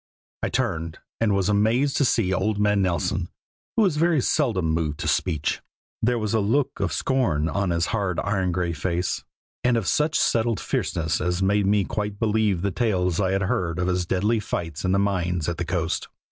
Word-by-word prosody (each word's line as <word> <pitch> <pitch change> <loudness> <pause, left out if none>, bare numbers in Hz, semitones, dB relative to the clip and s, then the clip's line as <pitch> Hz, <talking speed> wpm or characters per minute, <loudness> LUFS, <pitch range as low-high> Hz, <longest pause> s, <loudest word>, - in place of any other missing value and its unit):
I - - -1
turned, 80 0 -2 0.2
and 105 -3 +2
was 95 -2 +1
amazed 110 +7 +2
to 140 - +3
see 100 -6 +2
old 100 +3 0
man 105 -1 +3
Nelson, 90 -3 0 0.5
who 225 - +5
was 180 -7 +2
very 165 -1 +3
seldom 120 - +1
moved 80 -2 -1
to - - -2
speech. 80 -5 0 0.4
There 120 +2 +2
was 110 -2 -2
a 110 - +3
look 130 +6 0
of 100 -3 0
scorn 95 - +1
on 95 +3 -1
his 85 -1 +1
hard 100 -6 -1
iron 95 -3 0
gray 85 -1 -1
face, 85 +3 -2 0.4
and 125 -1 +3
of 110 - -1
such 150 - +1
settled 115 -2 +1
fierceness 80 0 -1
as 90 +1 0
made 100 +1 +2
me 100 0 +3
quite 105 +2 -3
believe 105 -4 +1
the 100 - 0
tales 90 -5 0
I 95 -1 +1
had 95 0 +1
heard 90 -6 -1
of 90 - 0
his 90 -1 0
deadly 105 +6 +1
fights 85 -6 -4
in 95 - +1
the 95 - +3
mines 90 -4 0
at 85 -1 -2
the 85 - -2
coast. 85 0 -1
95 Hz, 200 wpm, -24 LUFS, 90-110 Hz, 0.5 s, who